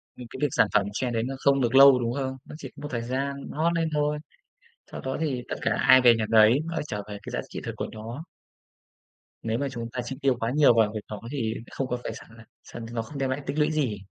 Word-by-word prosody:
Ừm, 125 - -10
cái - - -9
việc 150 - +3
sản 110 - +3
phẩm 100 - +3
trend 120 +2 -2
đấy 115 - 0
nó 135 +3 -3
không 140 -1 +3
được 120 +1 +1
lâu, 135 -1 +9
đúng 120 0 -1
không? 130 -1 -3
Nó - - -10
chỉ 135 -4 -8
có - - -12
một 145 - -4
thời 120 -2 -2
gian 135 +4 -2 0.2
hot 165 +3 +1
lên 165 -1 0
thôi, 150 0 +1 0.8
sau - - -6
đó 130 0 -3
thì 135 -6 -1
tất - - -3
cả - - +1
ai 130 0 +7
về 120 -2 +7
nhà 110 - 0
nấy, 110 +4 +6
nó 165 +1 -5
lại - - -1
trở - - -3
về 105 -1 -6
cái - - -8
giá - - -2
trị - - -6
thực - - -4
của - - -3
nó. 115 +8 -7 1.2
Nếu 110 0 -1
mà 140 +2 -1
chúng 115 -2 -5
ta 125 0 -3
chi 135 +2 -5
tiêu 135 -2 +3
quá 115 +1 -1
nhiều 145 -3 +5
vào 110 -2 +3
việc 110 - -3
đó 105 - -6
thì 115 -6 -1 0.2
không 135 - -3
có 125 - -2
phải - - -4
sàng - - -12 0.3
sàng 115 - -9
nó 115 - -1
không 140 +6 -9
đem 135 -1 -1
lại 130 +2 -2
tích 145 - -4
lũy 150 +1 +3
gì. 135 -9 0
130 Hz, 275 wpm, -26 LUFS, 115-140 Hz, 1.2 s, lâu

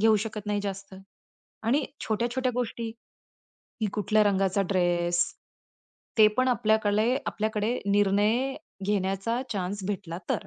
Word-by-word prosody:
घेऊ 220 0 +5
शकत 215 -2 -6
नाही 205 0 0
जास्त. 195 -1 -5 0.7
आणि 245 +7 +2 0.2
छोट्या-छोट्या 240 +3 0
गोष्टी, 235 -2 -2 0.9
की 220 - +2
कुठल्या 210 +1 +2
रंगाचा 195 -1 +2
ड्रेस 175 -2 +2 0.9
ते 215 - +9
पण 255 0 +3
आपल्याकले 220 -1 +2
आपल्याकडे 215 +2 -1
निर्णय 205 +6 +2 0.3
घेण्याचा 195 +3 0
चान्स 195 -1 -3
भेटला 190 -4 -4
तर. 195 - -1
210 Hz, 115 wpm, -27 LUFS, 195-225 Hz, 0.9 s, ते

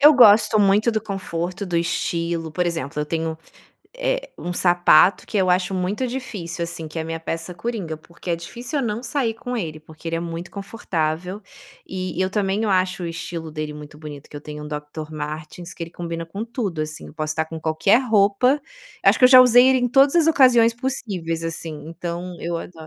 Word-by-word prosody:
Eu 295 +2 +9
gosto 220 -3 +7
muito 205 +3 +4
do 220 - 0
conforto, 190 -2 -4
do 175 -2 -1
estilo 170 -1 -1
por 180 +3 0
exemplo 150 -4 -3
eu 150 - -2
tenho, 160 0 -2 0.6
eh, - - -1
um 175 - -4
sapato 175 +1 +4
que 220 - -4
eu 185 -1 +3
acho 180 +1 +1
muito 195 +7 -1
difícil, 205 -10 -5
assim 165 -2 -6
que 155 - -6
é - - -1
a - - -6
minha 165 0 -4
peça 165 +2 -4
coringa, 180 -4 -4
porque 170 +3 -9
é 170 - +1
difícil 240 - -5
eu - - -1
não 215 +2 -3
sair 245 -2 -1
com 245 +2 -5
ele, 155 -7 -4
porque 160 +1 -10
ele 165 - -1
é - - -2
muito 170 0 -6
confortável 185 -2 -3 0.4
e 185 -1 -4
e - - 0
eu 190 - 0
também 200 +1 0
eu 210 - 0
acho 185 -1 +1
o - - -2
estilo 165 -1 -5
dele 155 -1 -5
muito 150 0 -11
bonito, 150 -2 -9
que - - -9
eu - - -6
tenho 150 0 -7
um - - -7
Doctor 150 +1 -6
Martens 155 +3 -6
que - - -7
ele 165 - -13
combina 170 -1 -5
com 200 +7 -5
tudo, 225 - -3
assim, 155 0 -6
eu - - -14
posso 155 -1 -2
tá 160 - 0
com 160 0 -8
qualquer 160 +8 +3
roupa 220 +6 +3 0.4
acho - - +5
que - - +5
eu - - +9
já 255 0 +10
usei 250 0 +7
ele 265 0 +4
em 245 0 +1
todas 270 +4 +5
as 330 -2 +5
ocasiões 250 -6 +6
possíveis, 200 -10 -3
assim, 160 -2 -5
então, 175 +1 -5
eu 170 0 -2
ado 175 - -8
175 Hz, 220 wpm, -22 LUFS, 165-220 Hz, 0.6 s, já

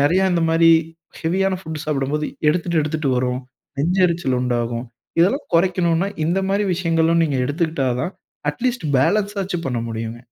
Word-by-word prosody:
நிறைய 160 +7 +3
அந்தமாரி 165 -1 +4 0.5
ஹெவியான 190 +4 +1
ஃபுட் 160 -4 -6
சாப்பிடும்போது 150 0 -1 0.2
எடுத்துட்டு 170 +1 +1
எடுத்துட்டு 155 -1 -2
வரும். 125 0 0 0.4
நெஞ்சு 175 +7 +1
எரிச்சல் 165 -7 0
உண்டாகும். 120 -1 -1 0.3
இதெல்லாம் 245 - +2
குறைக்கணுனா, 175 0 +2 0.2
இந்தமாரி 195 +4 +1
விஷயங்களும் 165 -1 +2
நீங்க 145 -4 -1
எடுத்துக்கிட்டாதான், 145 -1 -1 0.4
அட்லீஸ்ட் 235 - -2
ஃபேலன்ஸாச்சும் 195 +4 +1
பண்ண 125 -3 -1
முடியுங்க. 115 +1 -5
165 Hz, 120 wpm, -21 LUFS, 135-180 Hz, 0.5 s, அந்தமாரி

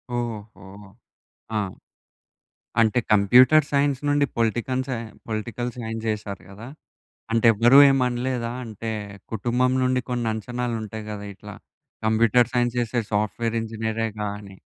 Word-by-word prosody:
ఓహో! 120 -3 -3 1.2
ఆ! - - +2 1.2
అంటే 115 +2 +3
కంప్యూటర్ 125 +9 +6
సైన్స్ 140 -2 +2
నుండి 145 0 +3
పొలిటికన్ 120 +3 0
సై 130 -3 -2 0.3
పొలిటికల్ 120 +2 -3
సైన్స్ 115 -1 -5
చేసారు 105 -2 -4
గదా! 105 +5 -10 0.6
అంటే 115 +1 +3
ఎవరు 120 +6 +6
ఏమనలేదా? 125 -2 0
అంటే 110 0 -5 0.4
కుటుంబం 120 +4 +1
నుండి 130 0 +1
కొన్ని 120 -2 -1
అంచనాలుంటాయి 110 -1 -4
గదా! 105 -1 -6
ఇట్లా 105 +1 -11 0.5
కంప్యూటర్ 115 +2 +3
సైన్స్ 120 -1 +1
చేసే 120 0 0
సాఫ్ట్‌వేర్ 110 +2 -1
ఇంజినీరేగాని 110 -3 -4
115 Hz, 110 wpm, -24 LUFS, 110-125 Hz, 1.2 s, కంప్యూటర్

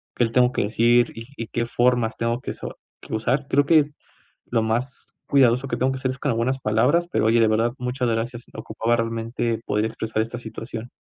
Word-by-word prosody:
qué 120 - +2
le 115 - -4
tengo 125 +1 +4
que - - 0
decir, 120 +2 +3
y 115 0 -8
y 115 - -4
qué 115 +2 -2
formas 120 -1 +1
tengo 115 +1 -1
que - - -4
so - - -8 0.4
usar, 125 +6 0
creo 140 +1 +3
que, 155 -2 +6 0.6
lo 115 -2 0
más 120 +5 -2 0.2
cuidadoso 130 -1 +3
que 120 - -1
tengo 130 +2 +1
que 130 - -4
hacer 130 0 -1
es 130 - -10
con 145 - -1
algunas 120 +3 0
palabras, 125 +10 +2
pero - - +2
oye 115 +1 +4
de 110 - +4
verdad 115 +2 +1
muchas 125 0 -2
gracias, 115 +1 -2
ocupaba 115 +1 -1
realmente 115 0 -2
poder 105 +1 0
expresar 110 0 -2
esta 115 +2 -5
situación. 115 0 -7
120 Hz, 205 wpm, -23 LUFS, 115-125 Hz, 0.6 s, que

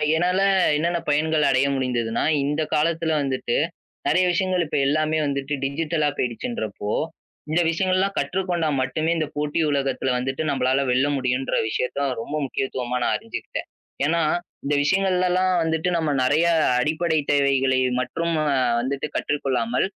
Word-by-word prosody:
என்னால 180 +3 +1 0.4
என்னென்ன 170 +3 0
பயன்கள் 155 +1 +2
அடைய 135 0 +3
முடிந்ததுன்னா, 120 -4 -1 0.2
இந்தக் 150 +2 -1
காலத்துல 160 +1 +1
வந்துட்டு 130 -3 -1 0.5
நறைய 185 - +3
விஷயங்கள் 185 -1 +1
இப்ப 150 - -2
எல்லாமே 155 +2 +1
வந்துட்டு 140 +1 -2
டிஜிட்டலா 150 +2 0
போயிடுச்சுன்றப்போ, 110 -4 -3 0.6
இந்த 160 +3 +2
விஷயங்கள்லாம் 185 +3 +1
கற்றுக்கொண்டால் 170 -6 0
மட்டுமே 155 +6 -1
இந்தப் 155 -2 -3
போட்டி 150 +2 -1
உலகத்துல 135 -2 0
வந்துட்டு 135 +3 -2
நம்மளால 130 -1 +1
வெல்ல 130 +3 +3
முடியும்ன்ற 130 0 -1
விஷயத்தை 125 +5 -2 0.2
ரொம்ப 145 +6 -5
முக்கியத்துவமா 125 -2 -3
நான் - - +1
அறிஞ்சுகிட்டேன். - - -6 0.4
ஏன்னா 165 +3 +2 0.4
இந்த 145 - 0
விஷயங்கள்லலாம் 185 +2 +2
வந்துட்டு 160 +1 0
நம்ம 160 -2 0
நறைய 150 +6 +3 0.3
அடிப்படை 160 +4 +1
தேவைகளை 135 -2 +2 0.2
மட்டும் 165 +7 -2
அ - - -1 0.3
வந்துட்டு 135 +4 -2
கற்றுக் 145 0 -1
கொள்ளாமல் 125 -2 0
150 Hz, 130 wpm, -23 LUFS, 130-165 Hz, 0.6 s, அடைய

